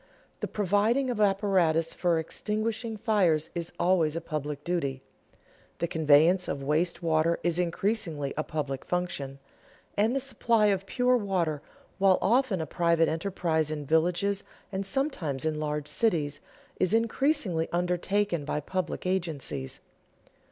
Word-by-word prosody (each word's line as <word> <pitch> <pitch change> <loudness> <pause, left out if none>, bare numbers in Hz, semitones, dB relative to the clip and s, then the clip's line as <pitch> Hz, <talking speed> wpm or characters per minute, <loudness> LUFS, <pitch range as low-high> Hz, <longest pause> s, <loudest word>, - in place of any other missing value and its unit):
The - - -2
providing 210 +6 +1
of 220 -3 -2
apparatus 190 -5 +2
for 175 -2 +1
extinguishing 215 +6 -2
fires 195 -8 +2
is 170 -1 -4
always 170 -3 +2
a - - 0
public 150 -3 -4
duty; 140 -7 -2 0.7
the 170 - -1
conveyance 160 +3 +4
of 140 -1 -3
waste 165 +5 0
water 165 +1 +2
is 175 0 +2
increasingly 170 -5 -1
a 155 - -1
public 145 -4 -4
function; 160 -7 -3 0.6
and 220 +5 +2
the - - +2
supply 235 -4 +1
of 195 0 -4
pure 250 +2 +2
water, 175 -8 -1 0.4
while 195 -1 +5
often 230 -4 +2
a - - -2
private 170 +1 +2
enterprise 160 -2 -1
in 150 -2 -4
villages, 180 +6 +1 0.3
and 195 0 -2
sometimes 185 - -1
in 155 -1 -1
large 150 -1 -2
cities, 155 -11 0 0.4
is 185 +4 +2
increasingly 230 - +1
undertaken 180 0 0
by 150 - -2
public 185 +5 -3
agencies. 155 - -2
175 Hz, 135 wpm, -28 LUFS, 155-205 Hz, 0.7 s, while